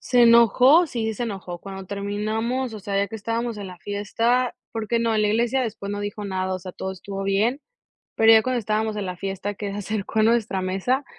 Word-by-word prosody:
¡Se 245 -1 +3
enojó! 240 - +6
Sí, 225 -5 -2
se 240 - -3
enojó, 190 -5 -6
cuando 195 +1 -8
terminamos, 215 +5 -2
o 215 - -6
sea, 200 +1 -3
ya 200 0 +1
que 220 - -6
estábamos 230 +1 -2
en 200 - -6
la 180 -1 -10
fiesta, 225 +6 0 0.2
porque 225 +1 -1
no, 230 -1 +1
en 215 - +2
la 210 - +2
iglesia 235 +5 +1
después 215 -3 -4
no 205 0 -3
dijo 205 0 -5
nada. 190 -1 -2
O - - -3
sea, 185 0 -9
todo 190 0 -5
estuvo 195 +1 -6
bien. 215 +8 +1 0.6
Pero 225 0 +6
ya 220 - +7
cuando 255 -1 0
estábamos 215 0 -1
en 200 - -2
la 180 - -4
fiesta 195 +2 -4
que 200 -1 -4
se 200 - -5
acercó 210 +1 -2
a 215 - +5
nuestra 220 -4 +2
mesa, 195 +9 0
215 Hz, 225 wpm, -24 LUFS, 195-235 Hz, 0.6 s, ya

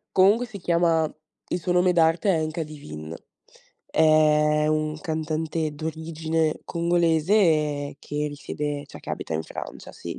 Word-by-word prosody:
Comunque 205 +6 +5
si 215 -4 -8
chiama 170 -3 +2 0.4
il 175 - -1
suo 180 - -2
nome 180 0 +4
d'arte 165 +3 +3
è 160 -2 +1
NK 155 +1 -3
DIVINE. 80 - -8 0.7
È 150 -1 +4
un 155 0 0
cantante 155 0 -2
d'origine 160 0 -2
congolese, 165 -3 +2
che 150 +1 -3
risiede 145 0 -4
cioè, - - -12
che - - -8
abita 80 - -4
in 80 - -1
Francia, - - -8
sì. - - -7
160 Hz, 135 wpm, -25 LUFS, 150-170 Hz, 0.7 s, Comunque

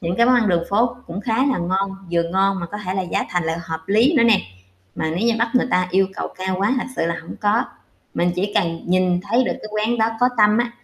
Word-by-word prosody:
những 175 +1 -2
cái 235 - +4
món 255 - +5
ăn 235 -4 +3
đường 170 -2 +2
phố 230 +4 +2
cũng 170 +4 -5
khá 225 +1 -1
là 270 - +1
ngon, 190 +3 -1 0.2
vừa 170 -1 +2
ngon 190 +3 0
mà 170 - -4
có 205 +5 -7
thể 185 -2 -4
là 190 - 0
giá 180 - -2
thành 175 -2 -1
lại 160 0 -1
hợp 160 -1 -5
lý 225 +9 +4
nữa 245 - +5
nè, 230 -3 +5 0.5
mà - - -2
nếu 215 +6 0
như 230 - +2
bắt 230 0 +1
người 250 - +3
ta 180 0 +2
yêu 190 +1 +3
cầu - - -4
cao 185 0 -2
quá 205 +7 +1
thật - - -3
sự 165 - 0
là 170 - -1
hổng 165 - -9
có. 210 +3 +2 0.5
Mình 175 - +1
chỉ 200 +3 -1
cần 165 -3 0
nhìn 180 0 +2
thấy 245 +3 +3
được - - 0
cái 215 - -9
quán 215 +3 0
đó 220 0 +3
có 250 - +5
tâm 210 +1 +5
á, 240 0 0
195 Hz, 275 wpm, -21 LUFS, 175-225 Hz, 0.5 s, món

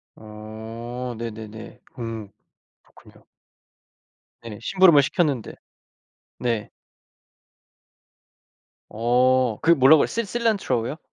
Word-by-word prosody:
어 110 +3 -8
네네네. 110 -1 -8 0.2
음 115 -2 -5 0.6
그렇군요. - - -21 1.2
네. 105 - -8
심부름을 170 -3 +5
시켰는데. 140 -8 -1 0.9
네. 115 -4 -2 2.3
어 125 +1 +2
그 165 - +4
뭐라고요? 140 0 +6
Cil 230 -1 -3
cilantro 200 - -1
요? 150 - -6
120 Hz, 200 characters per minute, -23 LUFS, 110-145 Hz, 2.3 s, 뭐라고요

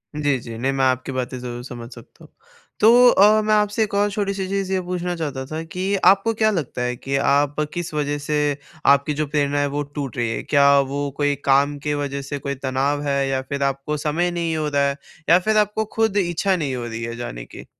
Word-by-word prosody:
जी, 145 -3 +1
जी। 115 -1 -8
नहीं 135 +3 0
मैं 135 -1 +1
आपकी 130 +1 0
बातें 130 0 -3
ज़रूर 120 -1 -6
समझ 120 -2 -8
सकता - - -16
हूँ। - - -17 0.5
तो 240 +3 +7
अ, 210 +1 +5
मैं 215 0 +1
आपसे 210 +1 +2
एक 205 - -5
और 205 +1 +2
छोटी-सी 200 -1 -2
चीज़ 195 -1 -2
ये 185 - +1
पूछना 180 0 -3
चाहता 145 -5 -4
था 155 +3 -5
कि 185 +5 -2
आपको 195 +4 +5
क्या 215 0 +2
लगता 150 - -3
है 125 0 -1
कि 135 +3 -4
आप 140 +1 +2 0.2
किस 175 -2 -4
वजह 145 -1 -1
से 150 +1 -2 0.5
आपकी 140 +2 +4
जो 150 0 -2
प्रेरणा 145 -1 0
है 145 - +1
वो 145 +1 -2
टूट 140 -4 -6
रही 120 -1 0
है? 115 - -3
क्या 140 -1 +5
वो 140 +1 -2
कोई 145 -1 +1
काम 140 +1 +3
की 150 +1 -2
वजह 140 -1 -3
से 140 +1 -5
कोई 140 0 -4
तनाव 135 +2 -1
है 140 -1 +1
या 130 -1 0
फिर 140 +1 -4
आपको 140 +2 -1
समय 160 +4 0
नहीं 170 -2 -2
हो 155 -1 -1
रहा 140 -1 +2
है 140 - -2 0.3
या 175 +2 +7
फिर 215 +3 +1
आपको 210 +1 +1
खुद 220 -2 +1
इच्छा 185 +1 +1
नहीं 145 -6 -2
हो 120 -1 -4
रही 115 0 -5
है 115 0 -4
जाने - - -6
की? - - -12
145 Hz, 235 wpm, -22 LUFS, 135-180 Hz, 0.5 s, तो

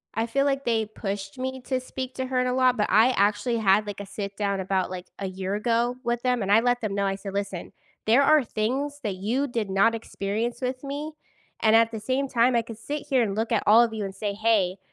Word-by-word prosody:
I 225 +1 0
feel 275 +4 0
like 275 -1 0
they 225 -2 +1
pushed 200 -1 -6
me 260 0 -4
to 260 -1 0
speak 255 0 -6
to 260 - -2
her 255 -1 0
a 250 0 0
lot, 255 -1 +3
but 210 - +1
I 220 +6 +5
actually 205 +2 +1
had, 210 -1 +3
like, 205 -1 -6
a 200 - -6
sit-down 200 0 -3
about, 190 -1 -1
like, 185 -1 -6
a 195 - -3
year 190 +1 -3
ago 235 +3 +1
with 240 0 -1
them, 250 -2 +1
and 195 0 -1
I 220 +2 +6
let 245 0 +1
them 210 -3 -2
know, 200 0 0
I 195 0 0
said, 195 0 -7
"Listen, 200 -3 -4 0.3
there 235 +6 +5
are 305 0 +5
things 265 +6 -2
that 205 -3 -2
you 235 +9 -1
did 230 -5 -3
not 200 +4 +3
experience 225 +2 -3
with 255 +1 -3
me." 290 +3 -5 0.5
and 220 0 +5
at 230 0 +4
the 220 - -5
same 260 +5 -1
time, 245 0 +3
I 235 - +3
could 230 -1 -10
sit 290 +6 -5
here 260 -2 +3
and 205 -4 -1
look 225 +2 -2
at 225 - +2
all 225 +3 +7
of 235 - -1
you, 215 -2 -3
and 195 0 -7
say, 205 +1 -3
"Hey, 205 -3 +1
225 Hz, 250 wpm, -25 LUFS, 200-255 Hz, 0.5 s, all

